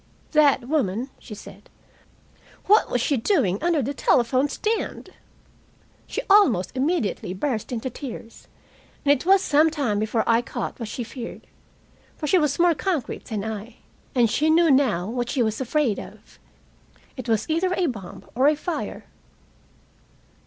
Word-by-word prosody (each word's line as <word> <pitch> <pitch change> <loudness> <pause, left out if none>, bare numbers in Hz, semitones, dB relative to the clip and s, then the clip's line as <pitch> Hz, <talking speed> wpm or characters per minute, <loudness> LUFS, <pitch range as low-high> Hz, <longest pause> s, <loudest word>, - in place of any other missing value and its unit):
"That 285 -5 +4
woman," 255 -4 -1
she 215 - -10
said, - - -13 1.0
"what 420 +3 +4
was 245 - 0
she 280 +3 +1
doing 225 - +1
under 335 -4 +1
the 275 +5 -2
telephone 255 +1 +2
stand?" 440 +9 -3 1.0
She - - -4
almost 300 - +4
immediately 255 - -1
burst 230 +1 -2
into 245 +1 -3
tears, 230 -3 -9 0.6
and 285 - +5
it 285 +4 +1
was 385 0 +5
some 305 0 +4
time 270 -10 -1
before 220 +1 0
I 230 0 +3
caught 240 - -5
what 230 -3 -5
she 240 - -4
feared. 235 +1 -8 0.7
For 310 - -4
she 365 +5 +4
was 295 -3 0
more 345 0 +4
concrete 335 -4 -3
than 215 -4 -4
I. 220 +1 -6 0.4
And 240 -2 +4
she 300 +8 +1
knew 330 0 +5
now 235 -10 +2
what 240 +1 -3
she 255 -3 +1
was 220 +2 -2
afraid 260 -4 0
of. - - -13 0.8
It 255 -2 -7
was 220 -1 +1
either 335 +4 +1
a 365 - +1
bomb 200 - -6
or 275 +5 +4
fire. 320 +2 -5
260 Hz, 150 wpm, -24 LUFS, 225-310 Hz, 1.0 s, and